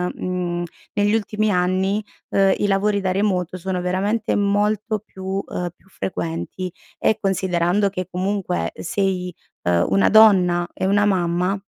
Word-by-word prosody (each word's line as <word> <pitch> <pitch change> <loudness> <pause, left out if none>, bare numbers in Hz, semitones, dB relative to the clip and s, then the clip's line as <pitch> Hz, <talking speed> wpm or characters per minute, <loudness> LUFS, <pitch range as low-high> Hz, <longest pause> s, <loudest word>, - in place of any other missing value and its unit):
mhmm, 175 -1 -2 0.3
negli 205 0 +2
ultimi 215 0 0
anni, 185 +3 +1 0.3
ehm, 195 -1 +4
i 205 - +1
lavori 200 +1 +1
da 190 -1 0
remoto 185 -3 0
sono 185 0 -3
veramente 200 +5 0
molto 210 +2 +1
più, 190 -1 -5
ehm, 180 0 -3
più 190 - -27
frequenti, 90 - -4 0.3
e 220 - +2
considerando 190 0 +1
che, 185 -2 -4
comunque, 185 0 -2
sei, 185 -3 -2 0.3
uhm, 85 0 +2
una 195 - +3
donna 185 -5 +6
e - - -3
una 205 +1 +3
mamma, 185 0 +1
190 Hz, 140 wpm, -21 LUFS, 180-205 Hz, 0.3 s, donna